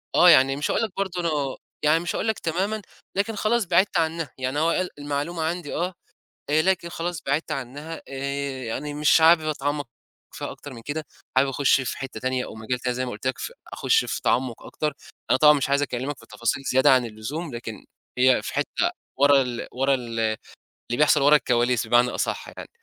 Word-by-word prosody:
آه، 180 - +8
يعني 135 -2 +6
مش 145 - -1
هاقول - - +1
لك 225 - -2
برضه 190 -3 -2
إنه 150 -5 -1 0.3
يعني 155 +2 +4
مش 175 - -3
هاقول 220 - -1
لك 220 - 0
تمامًا 195 +6 -1 0.3
لكن 210 +3 0
خلاص 220 +2 +1
بعدت 180 +2 +3
عنها، 160 -3 -1
يعني 130 +2 -2
هو 160 +2 +3
قال 180 +1 0
المعلومة 145 +3 -2
عندي 170 -1 -3
آه، 180 +2 -1 0.6
آآ، 155 +1 +4
لكن 185 -2 +1
خلاص 170 -1 -4
بعدت 140 +4 0
عنها 145 +5 -6
آآ، 140 -1 -4
يعني 145 +6 -4
مش 150 +2 +4
حابب 165 +1 +7
أتعمّق 145 -1 -2 0.5
فيها - - -5
أكتر 145 - -10
من 115 - -10
كده، 155 +5 -4 0.3
حابب 135 +1 +4
أخش 135 0 +3
في 130 - -4
حتّة 130 -4 -6
تانية 130 +1 -1
أو - - -9
مجال 110 +3 -3
تاني 125 0 -2
زي 130 +1 -1
ما - - -4
قُلت 110 +4 -8
لك 130 - 0
ف - - -5 0.2
أخش 450 - +2
في - - -3
تعمُّق 125 -2 0
أكتر، 150 -2 -3 0.4
أنا 130 - +5
طبعًا 150 +1 +8
مش 140 -2 0
عايز 140 +1 +3
أكلّمك 135 +1 -3
في - - -16
تفاصيل 115 +5 -2
زيادة 130 +1 +5
عن 130 -2 +4
اللزوم 120 +7 -5
لكن 110 -3 -7 0.3
هي 130 0 +4
في - - -6
حتّة - - 0 0.3
ورا 140 -1 +6
ال 120 -2 -4
ورا 135 +2 +2
ال 120 -3 -4 0.7
اللي 120 - 0
بيحصل 150 -1 +4
ورا 150 +2 +7
الكواليس 120 -3 +1
بمعنى 120 +2 +4
أصح - - -3
يعني. - - -8
145 Hz, 205 wpm, -24 LUFS, 130-165 Hz, 0.7 s, آه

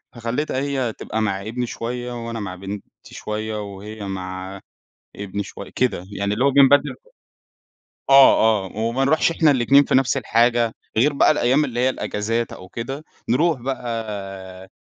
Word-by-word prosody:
فخلّيتها 120 +5 -2
هي 135 -5 -1
تبقى 110 - -4
مع 100 -3 -1
ابني 115 +4 -3
شوية 120 0 -5
وأنا 115 -1 -4
مع 95 -3 -5
بنتي 100 +2 -7 0.3
شوية 110 0 -4
وهي 100 +1 -8
مع 95 0 -6 0.6
ابني 100 0 -4
شوية، - - -10
كده 120 -8 0
يعني 100 +1 -1
اللي 125 - 0
هو 140 - +5
بنبدّل 140 0 +5 1.2
آه، 110 -7 +6
آه، - - -13
وما 115 +4 0
نرُوحش 155 +3 +3
إحنا 160 -2 +3
الإتنين 135 +2 +5
في - - 0
نفس 135 +1 +3
الحاجة، 115 -1 +2 0.2
غير 140 +6 +3
بقى 140 - +4
الأيام 140 +2 +2
اللي 120 -2 -4
هي 130 - +3
الإجازات 115 -1 -2
أو 95 - -11
كده 135 +7 -6 0.3
نرُوح 150 +2 +2
بقى 100 -7 -5
115 Hz, 155 wpm, -22 LUFS, 100-130 Hz, 1.2 s, آه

